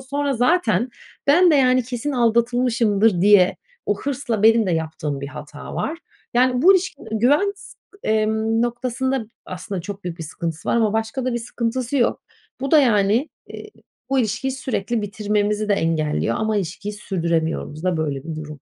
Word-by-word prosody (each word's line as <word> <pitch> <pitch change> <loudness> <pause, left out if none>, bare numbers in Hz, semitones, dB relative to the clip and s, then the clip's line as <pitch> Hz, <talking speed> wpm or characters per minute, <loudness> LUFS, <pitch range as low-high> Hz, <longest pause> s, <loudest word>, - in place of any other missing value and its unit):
Sonra 280 +1 -2
zaten 245 - +2 0.4
ben 345 +5 +6
de, 310 - +4
yani, 255 -2 +4
kesin 250 +4 -4
aldatılmışımdır 235 -4 +2
diye 200 -2 +5 0.3
o - - 0
hırsla 250 -6 -2
benim 225 -1 +5
de - - 0
yaptığım 155 -3 -3
bir 140 - -5
hata 150 0 -9
var. 330 +3 -3 0.4
Yani, 250 +1 +3
bu 380 +3 +8
ilişkide 355 -6 -2
güven, 290 - +3
s - - -14 0.3
emm, 220 +1 +1
noktasında 245 0 -2 0.2
aslında 185 0 -5
çok 200 +1 -8
büyük 175 -1 -5
bir - - -5
sıkıntısı 160 0 -5
var - - +2
ama 220 -2 +2
başka 225 +4 -2
da 255 - 0
bir 240 - -1
sıkıntısı 240 +3 -3
yok. 240 - +1 0.4
Bu 275 - -2
da, 310 - +7
yani, 220 +2 +2 0.2
eee, 425 - -9 0.4
bu 270 - +2
ilişkiyi 225 +3 0
sürekli 240 -4 -2
bitirmemizi 210 0 -1
de - - +3
engelliyor 160 -4 0
ama 220 -1 0
ilişkiyi 200 +2 -3
sürdüremiyoruz 165 -5 -2
da. 180 -2 +1
Böyle 145 -3 -2
bir 160 -2 -5
durum. 150 -2 -8
220 Hz, 165 wpm, -21 LUFS, 185-255 Hz, 0.4 s, bu